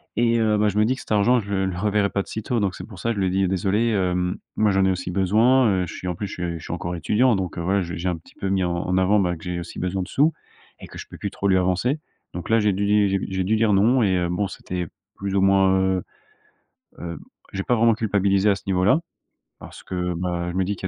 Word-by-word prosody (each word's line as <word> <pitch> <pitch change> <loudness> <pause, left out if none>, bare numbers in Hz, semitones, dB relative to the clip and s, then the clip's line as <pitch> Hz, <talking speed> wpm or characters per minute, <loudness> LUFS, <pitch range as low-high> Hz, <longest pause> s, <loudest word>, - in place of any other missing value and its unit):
et 115 0 +2
heu, 110 -1 +2
bah, 105 0 +2
je 105 - -4
me 105 - +4
dis 125 - +2
que 130 - -11
cet - - -13
argent 110 +4 +4
je 100 -2 -7
le 95 -1 +1
le 90 -2 -3
reverrai 105 0 +1
pas 100 - 0
de - - -10
sitôt. 110 +2 -2
Donc 100 -2 -1
c'est 90 - -8
pour 100 -4 -12
ça, 115 - -2
que 115 - 0
je - - -3
lui 95 - +2
ai - - +1
dit: 95 0 +1
«Désolé, 95 +5 +1
hem, 90 -3 0 0.2
moi 105 0 +3
j'en 95 0 +3
ai 95 - +3
aussi 90 -1 -3
besoin, 110 +8 +3
heu, 95 -2 +1
je - - -8
suis, 90 - -7
en 90 - -1
plus, 100 +3 -4
je - - -8
suis 85 -2 -4
je - - -12
suis - - -5
encore 85 +1 -4
étudiant, 110 +8 +2
donc 95 -2 -4
heu, - - -2
voilà», 95 +3 +1
je 85 -1 -5
j'ai 85 +3 -3
un 90 - -1
petit 80 - -19
peu 95 - -3
mis 95 -1 +1
en 90 -1 -1
en 90 +2 -1
avant, 100 +3 +3
ben, 90 -2 0
que - - -15
j'ai 90 -1 -3
aussi 85 - -8
besoin 90 +1 -2
de - - -9
sous 150 +4 +3 0.5
et - - -9
que - - -11
je - - -8
peux - - -10
plus 100 - -4
trop 100 - -2
lui 95 -1 +4
avancer. 95 - +1 0.4
Donc 90 +2 -6
là, 115 0 +4
j'ai 105 -1 +2
dû 100 +2 -1
di 105 -1 +3 0.2
j'ai 95 -1 -1
dû 110 +4 +1
dire 110 -1 +2
non 115 +6 +4
et 95 -3 +2
heu, 90 -1 0
bon, 90 +3 -1
c'était 90 -2 -5 0.3
plus 100 0 -4
ou 100 - +3
moins 95 0 +4
heu 95 -1 +1 1.0
heu, 85 -2 -6 0.4
j'ai 95 0 -2
pas 125 - +1
vraiment 115 0 +4
culpabilisé 100 -2 +2
à 100 - +2
ce - - -11
niveau-là 95 - +3 0.6
parce - - -11
que, 90 -1 -3
bah, 85 0 -2
je 85 - -8
me 95 - +1
dis 100 - -2
qu'il 95 - -5
95 Hz, 295 wpm, -23 LUFS, 90-105 Hz, 1.0 s, me